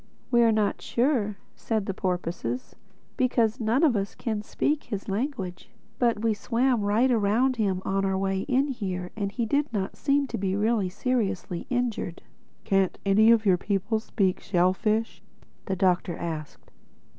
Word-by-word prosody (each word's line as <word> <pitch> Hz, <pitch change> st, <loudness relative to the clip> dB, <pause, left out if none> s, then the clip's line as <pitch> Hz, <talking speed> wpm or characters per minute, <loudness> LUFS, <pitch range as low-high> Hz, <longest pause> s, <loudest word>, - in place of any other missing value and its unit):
"We're 235 Hz, -2 st, +5 dB
not 215 Hz, -2 st, 0 dB
sure," 235 Hz, -5 st, 0 dB, 0.2 s
said 220 Hz, -3 st, -2 dB
the 195 Hz, -, -2 dB
porpoises; 175 Hz, -, -3 dB, 0.4 s
"because 240 Hz, -3 st, +2 dB
none 230 Hz, +6 st, +1 dB
of 285 Hz, -7 st, +4 dB
us 200 Hz, -1 st, -2 dB
can 220 Hz, -3 st, -3 dB
speak 295 Hz, +7 st, -1 dB
his 205 Hz, -4 st, -5 dB
language. 200 Hz, -4 st, -3 dB, 0.3 s
But 230 Hz, -3 st, +1 dB
we 225 Hz, -1 st, +3 dB
swam 240 Hz, +2 st, +1 dB
right 215 Hz, +6 st, +2 dB
around 235 Hz, +4 st, +2 dB
him 190 Hz, -4 st, 0 dB
on 195 Hz, 0 st, 0 dB
our 190 Hz, -1 st, +1 dB
way 195 Hz, 0 st, 0 dB
in 275 Hz, +2 st, +2 dB
here, 185 Hz, -8 st, -4 dB
and 200 Hz, -2 st, -2 dB
he 230 Hz, +3 st, -2 dB
did 285 Hz, +5 st, 0 dB
not 195 Hz, -4 st, -2 dB
seem 285 Hz, 0 st, +1 dB
to 230 Hz, -, -3 dB
be 190 Hz, -1 st, 0 dB
really 210 Hz, -2 st, +1 dB
seriously 205 Hz, -4 st, -2 dB
injured." 245 Hz, -8 st, -2 dB, 0.4 s
"Can't 195 Hz, -2 st, +1 dB
any 210 Hz, +3 st, +5 dB
of 230 Hz, -1 st, +5 dB
your 185 Hz, -3 st, +5 dB
people 205 Hz, +3 st, 0 dB
speak 195 Hz, -4 st, 0 dB
shellfish?" 205 Hz, +5 st, 0 dB, 0.5 s
the 190 Hz, -, 0 dB
Doctor 180 Hz, -2 st, +1 dB
asked. 155 Hz, -3 st, -6 dB
210 Hz, 155 wpm, -26 LUFS, 190-235 Hz, 0.5 s, We're